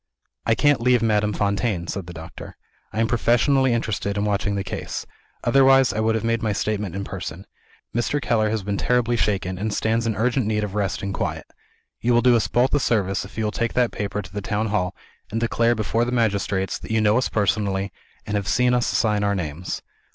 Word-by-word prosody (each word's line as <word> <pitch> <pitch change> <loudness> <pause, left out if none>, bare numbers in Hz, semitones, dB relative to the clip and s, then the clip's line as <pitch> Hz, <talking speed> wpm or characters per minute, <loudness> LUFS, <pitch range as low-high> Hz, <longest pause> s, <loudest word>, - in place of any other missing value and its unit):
"I 115 - +4
can't 145 -2 +3
leave 125 -1 +3
Madame 105 -2 +2
Fontaine," 100 -2 0
said 95 +1 -5
the 90 - -8
doctor; 80 +1 -10 0.3
"I 110 - -4
am 115 - +2
professionally 125 +3 +3
interested 105 -3 -1
in 100 - 0
watching 100 -1 0
the 100 - -1
case. 95 - -5 0.4
Otherwise, 135 -1 +5
I - - -2
would 110 0 +2
have 115 - -1
made 115 0 0
my 110 -2 0
statement 105 -3 -2
in 100 - -3
person. 95 -1 -6 0.5
Mr. 120 +5 0
Keller 110 -5 +1
has 110 -2 -2
been 100 0 -2
terribly 120 +1 +1
shaken, 95 -5 -1
and 110 +2 -1
stands 115 +2 0
in 110 - 0
urgent 120 +1 +1
need 105 -1 0
of 100 -2 -4
rest 100 -3 -1
and 100 0 -2
quiet. - - -3 0.5
You 120 0 +2
will 120 - +4
do 125 -1 +6
us 115 - +2
both 125 +2 +2
a 145 - +4
service 95 - 0
if 95 - -14
you 110 - 0
will 105 - 0
take 115 +1 -2
that 125 -2 +2
paper 105 0 -3
to 90 - -13
the 105 - -3
town 110 +1 -1
hall, 95 -4 -1 0.3
and 115 - -2
declare 115 0 +2
before 110 +2 0
the 120 - -2
magistrates 100 -5 0
that - - -10
you 110 0 +2
know 110 +2 +4
us 130 - -1
personally, 100 -1 0 0.3
and 105 - -3
have 100 -1 -1
seen 125 +3 +3
us 125 -1 +2
sign 105 -2 +1
our 100 0 +1
names. 85 0 -4
105 Hz, 220 wpm, -23 LUFS, 100-115 Hz, 0.5 s, do